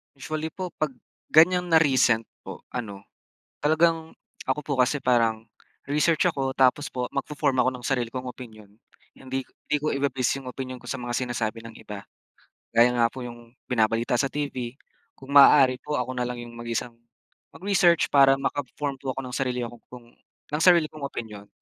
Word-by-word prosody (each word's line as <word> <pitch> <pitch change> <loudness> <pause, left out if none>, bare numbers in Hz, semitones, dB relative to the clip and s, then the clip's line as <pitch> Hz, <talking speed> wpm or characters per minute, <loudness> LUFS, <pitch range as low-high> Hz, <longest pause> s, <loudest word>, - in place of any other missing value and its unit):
Usually 155 +3 -5
po 185 -1 -5
'pag 150 -3 -1 0.4
ganyan 180 +3 +6
na 160 - +7
recent 130 -6 +3 0.2
po, - - -8
ano, 100 -5 -6 0.6
talagang 160 +1 +1 0.3
ako 130 +3 0
po 145 - -4
kasi 130 +3 +2
parang 115 -3 +2 0.5
research 150 0 +2
ako 135 -1 -2
tapos 135 +3 +3
po 125 -1 -4
magfo-form 140 -1 -1
ako 130 +1 +4
ng 125 - -9
sarili 125 -4 -1
kong 130 0 -4
opinyon. 110 -5 -12 0.5
Hindi 130 0 -4
hindi 150 - -4
ko 155 - 0
ibe-base 135 -2 0
'yong 135 - -11
opinyon 130 -1 -6
ko 125 - -16
sa 125 +1 -4
mga 120 0 -4
sinasabi 120 -3 -2
ng 115 - -11
iba. 105 -1 -9 0.7
Gaya 120 +1 +6
nga 120 -1 +3
po 130 +1 -8
'yong 120 0 -11
binabalita 115 0 +1
sa 135 - +1
TV, 130 -3 -4 0.4
kung 135 +1 -11
maaari 135 -2 +7
po 150 0 -3
ako 125 0 -2
na 125 -1 -2
lang 125 - -4
'yong 120 0 -9
mag-isang 120 0 -4 0.6
mag-research 180 -3 +2
para 135 -1 +6
maka-form 140 0 -3
po 130 -2 -4
ako - - -2
ng 125 -1 -7
sarili 125 -2 -1
ko 120 0 -9
pong 120 -1 -13 0.4
ng 150 +2 0
sarili 170 -4 +5
kong 145 -2 -5
opinyon. 105 -5 -8
130 Hz, 175 wpm, -25 LUFS, 120-145 Hz, 0.7 s, na